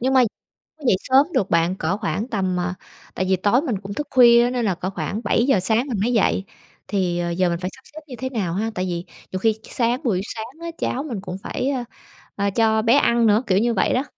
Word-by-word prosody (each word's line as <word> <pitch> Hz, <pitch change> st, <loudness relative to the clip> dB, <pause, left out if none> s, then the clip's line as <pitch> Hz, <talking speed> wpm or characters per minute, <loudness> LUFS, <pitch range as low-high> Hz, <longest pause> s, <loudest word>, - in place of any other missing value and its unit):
Nhưng 260 Hz, +2 st, +1 dB
mà 260 Hz, -, +6 dB, 0.7 s
dậy 195 Hz, -, +5 dB
sớm 265 Hz, +2 st, +4 dB
được 195 Hz, -, +1 dB
bạn, 170 Hz, +2 st, +2 dB
cỡ 185 Hz, +1 st, -1 dB
khoảng 200 Hz, +4 st, -2 dB
tầm, 190 Hz, -6 st, -1 dB
à 180 Hz, 0 st, -1 dB, 0.4 s
tại 185 Hz, -, -1 dB
vì 190 Hz, -, +4 dB
tối 205 Hz, +8 st, +2 dB
mình 245 Hz, -, -2 dB
cũng 200 Hz, 0 st, -6 dB
thức 295 Hz, +7 st, -4 dB
khuya 240 Hz, -3 st, +7 dB
á, 240 Hz, -, +1 dB
nên 245 Hz, -2 st, -1 dB
là 190 Hz, -4 st, +1 dB
cỡ 180 Hz, +2 st, -4 dB
khoảng 205 Hz, +2 st, -4 dB
7:00 230 Hz, +2 st, +2 dB
sáng 220 Hz, +8 st, +1 dB
mình 235 Hz, -7 st, -2 dB
mới 240 Hz, +4 st, +1 dB
dậy. 200 Hz, -3 st, +2 dB, 0.4 s
Thì, 180 Hz, -4 st, 0 dB
ờ, 175 Hz, 0 st, -1 dB
giờ 180 Hz, +1 st, +1 dB
mình 170 Hz, 0 st, -2 dB
phải 180 Hz, 0 st, -3 dB
sắp -, -, -18 dB
xếp 310 Hz, -, -8 dB
như 260 Hz, -, -8 dB
thế 260 Hz, -, -3 dB
nào 205 Hz, -10 st, -2 dB
ha? 220 Hz, +5 st, -1 dB
Tại 185 Hz, -, -1 dB
vì 175 Hz, -1 st, -3 dB, 0.3 s
nhiều 185 Hz, -, -3 dB
khi 225 Hz, +3 st, +3 dB
s 220 Hz, 0 st, -17 dB
sáng 245 Hz, +4 st, 0 dB
buổi 195 Hz, -7 st, +1 dB
sáng 230 Hz, +7 st, -8 dB
á, 335 Hz, -, -5 dB
cháu 265 Hz, -, -2 dB
mình 240 Hz, -10 st, -5 dB
cũng 180 Hz, -2 st, -6 dB
phải, 265 Hz, -, -2 dB
a, 260 Hz, -3 st, -2 dB, 0.5 s
à, 200 Hz, 0 st, 0 dB
cho 220 Hz, +1 st, +2 dB
bé 230 Hz, +1 st, +3 dB
ăn 235 Hz, -5 st, +3 dB
nữa, 215 Hz, +3 st, +3 dB
kiểu 185 Hz, -, +3 dB
như 235 Hz, +2 st, +1 dB
vậy 195 Hz, -, +1 dB
đó. 255 Hz, -, +1 dB
220 Hz, 260 wpm, -22 LUFS, 185-245 Hz, 0.7 s, khuya